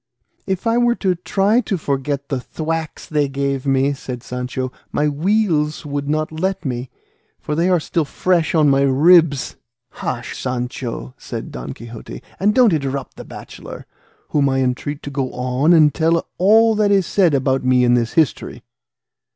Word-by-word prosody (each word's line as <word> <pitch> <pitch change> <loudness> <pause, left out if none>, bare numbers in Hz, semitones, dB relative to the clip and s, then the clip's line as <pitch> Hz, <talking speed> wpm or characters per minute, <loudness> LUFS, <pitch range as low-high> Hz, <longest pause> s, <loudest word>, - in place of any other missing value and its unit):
"If 190 +2 -2
I 230 +1 +2
were 240 0 +3
to 190 -5 0
try 195 +6 +1
to 195 - -2
forget 140 -1 -3
the 135 -3 -1
thwacks 160 +4 -4
they 150 -2 0
gave 140 0 -2
me," 135 +1 +2
said 125 -3 -7
Sancho, 125 +1 -4 0.2
"my 150 - +1
weals 155 -1 0
would 145 0 -3
not 155 +1 -1
let 180 +2 -2
me, 125 -1 -3 0.5
for 150 - -4
they 170 +4 +1
are 180 -2 +3
still 160 +1 -1
fresh 170 +3 0
on 155 -2 +4
my 140 -1 +4
ribs." 145 +2 +4 0.3
"Hush, 125 - -5
Sancho," 125 - -4
said - - -7
Don 60 0 -6
Quixote, 115 0 -10 0.2
"and 210 +3 +2
don't 245 -7 +5
interrupt 140 -3 -3
the - - -9
bachelor, - - -10 0.4
whom 140 -2 +2
I 135 0 +1
entreat 130 +3 -2
to 145 - -6
go 135 -2 -2
on 125 +5 +1
and 155 -3 +6
tell 165 +1 +1
all 220 +4 +5
that 210 -1 +2
is 195 -2 +3
said 175 -6 +2
about 135 0 +1
me 125 0 +3
in 120 0 +4
this 120 -2 +1
history." 160 -5 0
145 Hz, 170 wpm, -19 LUFS, 130-175 Hz, 0.5 s, and